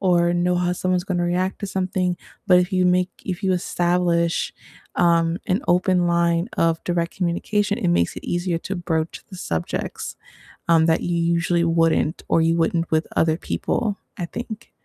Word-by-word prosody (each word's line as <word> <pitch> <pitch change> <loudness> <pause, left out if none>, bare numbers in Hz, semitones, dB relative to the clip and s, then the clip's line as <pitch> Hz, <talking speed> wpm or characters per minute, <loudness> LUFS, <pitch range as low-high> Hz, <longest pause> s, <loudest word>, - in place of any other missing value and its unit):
or 175 -2 +3
know 175 +1 +1
how 180 0 +1
someone's 180 0 0
gonna 180 -3 -1
react 180 +2 -1
to 200 - -3
something, 185 -1 -1 0.3
but, 180 - +7
if 180 +2 0
you 185 -1 +2
make 180 +1 +2
if 185 +1 -4
you 190 - +3
establish, 175 -1 +1 0.4
um, 170 0 +3
an 190 +6 +1
open 180 0 +3
line 170 +2 +2
of 165 -1 +1
direct 170 -1 -1
communication, 205 +4 0
it 205 - -1
makes 175 - +1
it - - -8
easier 175 -1 -1
to 190 +3 -5
broach 165 -2 -2
the 185 - -8
subjects, 85 - -4 0.5
um, 165 -1 +5
that 165 0 +2
you 175 -1 -1
usually 170 +1 +1
wouldn't 165 -1 +2
or 165 - +4
you 165 +1 +3
wouldn't 165 0 +1
with 155 0 +1
other 160 0 +2
people, 205 +2 -2 0.2
I 175 - -1
think. 230 +4 -7
175 Hz, 175 wpm, -22 LUFS, 170-185 Hz, 0.5 s, but